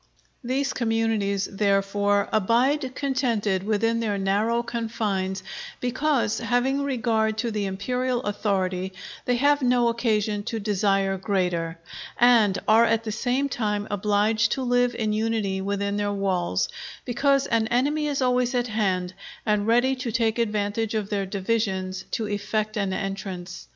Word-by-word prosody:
These 270 +3 -1
communities, 225 -4 0
therefore, 200 0 +1
abide 255 +6 +2
contented 235 -8 0
within 220 +3 +1
their 210 -3 -1
narrow 210 +5 +1
confines, 205 -5 -2 0.4
because, 260 -2 0
having 245 +4 +1
regard 225 -5 0
to 230 +1 -1
the 210 -2 -1
Imperial 250 +6 -1
authority, 190 -3 -1 0.3
they 245 - +2
have 285 +3 +3
no 245 -2 +3
occasion 215 -3 0
to 225 - -3
desire 195 -2 +1
greater; 180 -4 -1 0.4
and 230 -5 +5
are 220 +2 +6
at 225 0 +1
the 220 - -3
same 250 +5 0
time 210 -5 -2
obliged 210 +2 +2
to 265 - -3
live 245 0 +2
in 215 -2 -1
unity 215 -3 -1
within 200 +1 -1
their 205 0 0
walls, 185 - 0 0.4
because 275 +2 +2
an 225 -2 +1
enemy 290 +6 +1
is 280 -2 0
always 250 0 +1
at 245 -1 0
hand, 185 -4 0 0.3
and 210 -1 +1
ready 245 +3 +3
to 250 -2 -3
take 225 0 +1
advantage 210 0 -1
of 210 -1 -2
their 200 -2 -1
divisions 190 -2 -2
to 220 - -2
effect 210 +1 -2
an 200 -3 -1
entrance. 190 -3 -5
215 Hz, 140 wpm, -25 LUFS, 200-240 Hz, 0.4 s, are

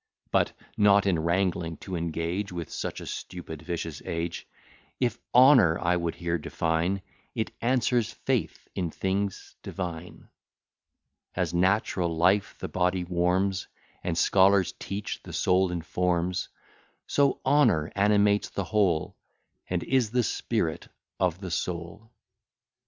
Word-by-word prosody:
But - - +2 0.2
(not 100 -1 +5
in 90 -4 +2
wrangling 85 -1 0
to 95 - -5
engage 85 +4 -2
With 85 -2 -6
such - - -4
a - - -7
stupid, 85 -4 -7
vicious 80 -2 -4
age) 85 0 -4 0.5
If 125 -2 0
honour 125 - +7
I 85 +1 +1
would 85 -1 -2
here 85 -1 -2
define, 85 +5 -1 0.3
It 110 -2 -2
answers 120 -2 +1
faith - - -2
in 90 -3 -2
things 95 +3 -3
divine. 90 -2 -6 1.1
As 90 -2 -1
natural 90 -2 +1
life 95 +4 +3
the - - -5
body 90 0 0
warms, 90 +2 0 0.4
And, 85 -2 -1
scholars 95 +1 +4
teach, 100 +1 -5
the - - -10
soul 90 0 +2
informs, 90 +1 -1 0.6
So 140 -1 +2
honour 130 - +3
animates 105 0 +3
the 100 - -3
whole, 90 -3 +1 0.5
And 90 -1 -1
is 130 -4 +2
the 125 +2 +1
spirit 105 -7 -2 0.3
of 90 -1 +1
the 95 -3 -5
soul. 85 +7 -4
90 Hz, 125 wpm, -27 LUFS, 85-100 Hz, 1.1 s, honour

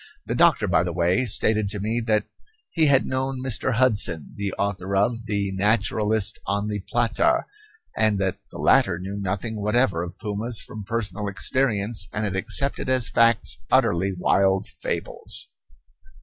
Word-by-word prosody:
The - - -3
doctor, - - +3
by - - +3
the 90 - -2
way, 90 +8 +1
stated 110 -1 +2
to 105 0 -4
me 110 +4 -1
that 105 -1 +2 0.5
he 160 -3 +3
had 140 -2 +4
known 130 0 -2
Mr. 130 0 +1
Hudson, 105 - +1
the 100 -1 -3
author 100 -1 -2
of 115 +3 0
the 100 -2 -1
"Naturalist 105 +1 +1
on 100 +1 -1
the 105 -1 -3
Plata," 120 - +1 0.5
and 110 -2 +2
that 95 -1 -1
the - - -11
latter 90 -3 +3
knew 95 +3 -6
nothing 100 +3 -3
whatever 105 -4 +1
of 85 0 -7
pumas 110 +2 -2
from 105 -2 -6
personal 105 -1 -3
experience 105 -1 0
and 105 - -3
had 100 -3 -2
accepted 115 +8 0
as 130 -3 +2
facts 115 - +3
utterly 95 +3 +2
wild 95 +1 +2
fables. - - -4
105 Hz, 155 wpm, -23 LUFS, 95-115 Hz, 0.5 s, had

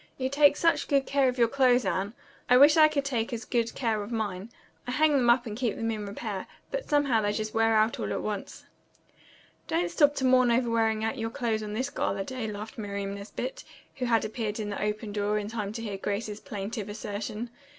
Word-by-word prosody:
You 260 0 -1
take 285 +1 +5
such 330 0 +2
good 275 -2 +2
care 275 -2 +2
of 250 - -4
your 235 -1 +4
clothes, 250 -1 +3
Anne. 190 +4 -1 0.3
I 250 - +7
wish 290 +3 +8
I 310 -1 +8
could 285 -2 -1
take 235 -5 -1
as 230 -2 -4
good 235 -1 -1
care 225 -5 0
of 205 +3 -7
mine. 210 -3 -3 0.4
I - - -2
hang 310 +3 +4
them 260 -4 +3
up 240 +1 +4
and 215 -3 -5
keep 235 -3 -1
them 225 0 -2
in 210 -2 -4
repair, 200 -1 -5 0.2
but - - -4
somehow 280 -6 +3
they 205 0 +1
just 215 +1 -3
wear 225 0 +3
out 215 +1 +2
all - - -2
at - - -2
once." 210 -2 -5 1.0
"Don't 340 +2 0
stop 290 -3 +4
to 265 - -1
mourn 255 -1 +5
over 235 0 +2
wearing 220 -1 +1
out 225 +3 -2
your 225 0 -2
clothes 225 -2 -1
on 210 -1 -5
this 255 +6 -2
gala 195 -8 -1
day," 250 +1 -4
laughed 215 +5 -7
Miriam 200 -1 -4
Nesbit, 215 - -6 0.3
who 255 - -2
had 230 -2 +2
appeared 215 -1 -3
in 210 -1 -3
the 200 - -4
open 210 0 -2
door 205 0 0
in 205 -1 -3
time 210 -2 -4
to 230 0 -5
hear 205 -3 -4
Grace's 205 +1 -3
plaintive 205 +1 -5
assertion. 210 +2 -5
225 Hz, 225 wpm, -28 LUFS, 210-255 Hz, 1.0 s, wish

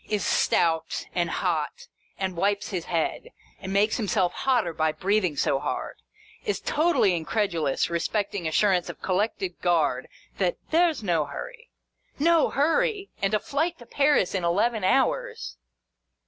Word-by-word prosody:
Is 210 -3 0
stout 165 -1 +1
and 175 -1 0
hot, 160 -5 -2 0.3
and 190 -1 -2
wipes 200 +3 0
his 180 -5 -3
head, 170 - -2 0.3
and 190 -1 -6
makes 205 +3 +2
himself 200 -5 +1
hotter 240 -10 +1
by 160 0 +1
breathing 190 -5 0
so 135 -1 +1
hard. 145 - -4 0.5
Is 420 - -1
totally 310 - +2
incredulous 165 -4 0
respecting 180 +2 -2
assurance 180 +2 +2
of - - -9
Collected 190 -1 -1
Guard 160 -7 +1 0.3
that 180 -3 +1
" - - -30
there 340 +1 +4
's 265 -8 -8
no 170 -6 +1
hurry." 475 - -8 0.5
No 330 +2 +4
hurry! 390 - +1
And 200 +2 +2
a - - +2
Flight 320 +8 -1
to 240 - -13
Paris 280 -8 +2
in 190 -3 -1
eleven 205 +5 +1
hours 460 - 0
195 Hz, 150 wpm, -26 LUFS, 170-270 Hz, 0.5 s, there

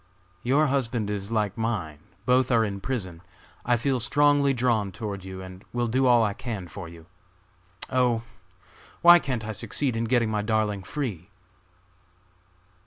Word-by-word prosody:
"Your 140 +5 +3
husband 120 -6 -1
is 100 0 -4
like 105 -4 0
mine, 100 -10 -3 0.3
both 125 0 +3
are 115 -3 +3
in 100 -1 -5
prison. 95 -9 -4 0.4
I 120 0 +2
feel 130 +2 0
strongly 145 +3 +4
drawn 115 -6 +1
toward 100 -3 -6
you 95 0 -8
and 95 0 -11
will 120 0 0
do 130 +3 +1
all 120 -2 +5
I 105 -2 0
can 105 -6 -6
for 85 0 -8
you. 85 -1 -13 0.8
Oh! 125 -3 +1 0.8
why 175 0 +9
can't 125 -8 -3
I 110 - -3
succeed 125 +4 -1
in 115 +1 -1
getting 115 -2 +1
my 105 -1 0
darling 105 -2 0
free!" 100 - -5
115 Hz, 155 wpm, -26 LUFS, 100-125 Hz, 0.8 s, why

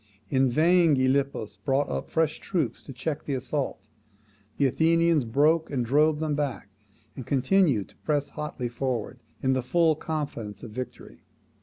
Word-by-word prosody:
In 135 -1 +3
vain 165 +3 +4
Gylippus 130 -3 0
brought 140 0 +1
up 65 - -4
fresh 160 -1 0
troops 165 - -2
to - - -10
check 140 +4 -4
the 140 - -1
assault: 130 -5 -3 0.7
the 140 - +3
Athenians 165 +1 +3
broke 150 +7 +2
and 125 -4 -1
drove 150 +4 +3
them 155 -1 -1
back, 145 -8 -3 0.5
and 130 - -6
continued 135 - +2
to - - -23
press 145 -2 -1
hotly 150 -5 -4
forward, 125 0 -3 0.2
in 130 0 +3
the 130 - +1
full 160 +5 +2
confidence 145 -10 -5
of 115 - -8
victory. 125 +3 -8
140 Hz, 155 wpm, -26 LUFS, 130-155 Hz, 0.7 s, vain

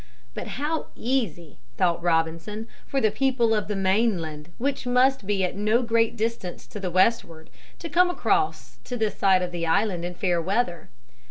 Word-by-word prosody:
But - - -6
how 310 +2 -2
easy, 215 - -2 0.2
thought 175 -2 +2
Robinson, 165 +6 -1 0.2
for 275 - 0
the 220 -4 +2
people 255 -4 +2
of 210 -3 0
the 210 - -2
mainland, 190 -6 0
which 275 0 -2
must 250 -3 +3
be 200 -2 +1
at 180 - -1
no 215 +5 +2
great 230 0 +1
distance 220 -5 -3
to 210 - -7
the 190 -2 -3
westward, 175 -4 +1 0.3
to 340 - -6
come 355 +3 +4
across 155 - 0
to 245 - -4
this 220 -2 0
side 190 -2 +3
of 180 - -3
the 170 -1 -3
island 180 0 +1
in 175 0 -4
fair 175 -1 +1
weather. 185 -1 -1
205 Hz, 175 wpm, -25 LUFS, 175-235 Hz, 0.3 s, come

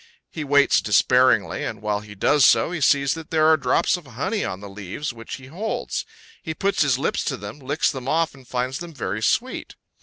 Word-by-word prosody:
He 155 - -5
waits 140 0 +4
despairingly, 125 +4 +3
and - - -4
while 105 0 -1
he 105 0 -12
does 145 +8 +3
so, 115 +5 +5
he 175 -4 -4
sees 140 -1 +3
that 160 -1 -8
there 155 -1 +2
are 160 0 +6
drops 165 +4 +1
of 170 -5 -13
honey 185 - -2
on 90 - -4
the 100 - -9
leaves 100 +8 -6
which 115 -1 -8
he 130 - -12
holds; 185 +11 -4 0.3
he 160 -1 -5
puts 200 +3 0
his 140 -4 +3
lips 140 - -1
to 135 - -2
them, 105 +6 -8
licks 145 +3 0
them 130 -3 -7
off, 165 +3 +1
and 135 -3 -17
finds 125 +2 -2
them 170 -2 -9
very 110 -4 -3
sweet. 255 - -1
140 Hz, 215 wpm, -23 LUFS, 115-160 Hz, 0.3 s, are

